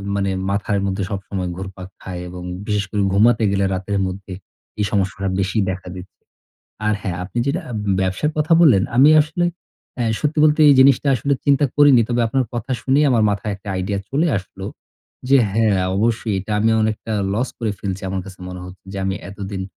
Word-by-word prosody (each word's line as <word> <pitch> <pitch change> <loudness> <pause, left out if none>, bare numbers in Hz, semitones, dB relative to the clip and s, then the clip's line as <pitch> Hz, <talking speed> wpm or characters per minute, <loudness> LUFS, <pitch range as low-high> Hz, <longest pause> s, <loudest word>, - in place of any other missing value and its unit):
মানে 100 -1 0 0.2
মাথার 100 +1 0
মধ্যে 95 0 -2
সবসময় 95 -2 -4
ঘুরপাক 95 -1 -8
খায় 90 -1 -6
এবং 90 0 -8 0.2
বিশেষ 105 -1 0
করে 105 - 0
ঘুমাতে 110 +3 +4
গেলে 100 0 +1
রাতের 95 +2 -2
মধ্যে 95 +1 -7 0.5
এই 105 - +2
সমস্যাটা 95 -2 -1
বেশি 95 +3 -1
দেখা 95 0 -5
দিচ্ছে। 90 +1 -12 0.7
আর 105 - +2
হ্যাঁ! 90 -5 -3
আপনি 100 +6 -5
যেটা 155 +7 -1 0.4
ব্যবসার 95 +10 0
কথা 155 +2 +1
বললেন, 130 - +6
আমি 140 +4 +7
আসলে 155 +3 -1 0.5
অ্যা 120 - -1 0.2
সত্যি 155 +1 -1
বলতে 155 0 +3
এই 145 - +7
জিনিসটা 140 +1 +5
আসলে 140 +4 0
চিন্তা 140 0 +3
করিনি। 145 -4 +6
তবে 120 0 0
আপনার 130 +3 0
কথা 120 +2 -5
শুনেই 140 +3 +3
আমার 115 -3 +3
মাথায় 100 +1 -2
একটা 100 +1 -12
আইডিয়া 95 +2 -2
চলে 150 +5 +1
আসলো। 95 0 -9 0.6
যে 140 - +6 0.2
হ্যাঁ, 105 -3 +2 0.2
অবশ্যই 110 0 0
এটা 100 +3 -5
আমি 110 +2 +2
অনেকটা 110 +1 -2 0.2
লস 125 +5 0
করে 115 -3 -1
ফেলছি। 95 -1 -4
আমার 95 0 -2
কাছে 95 -1 -12
মনে 90 0 -7
হচ্ছে। 90 +1 -12
যে 100 - -5
আমি 95 0 -1 0.2
এতদিন 100 -1 -6
100 Hz, 185 wpm, -20 LUFS, 95-125 Hz, 0.7 s, আমি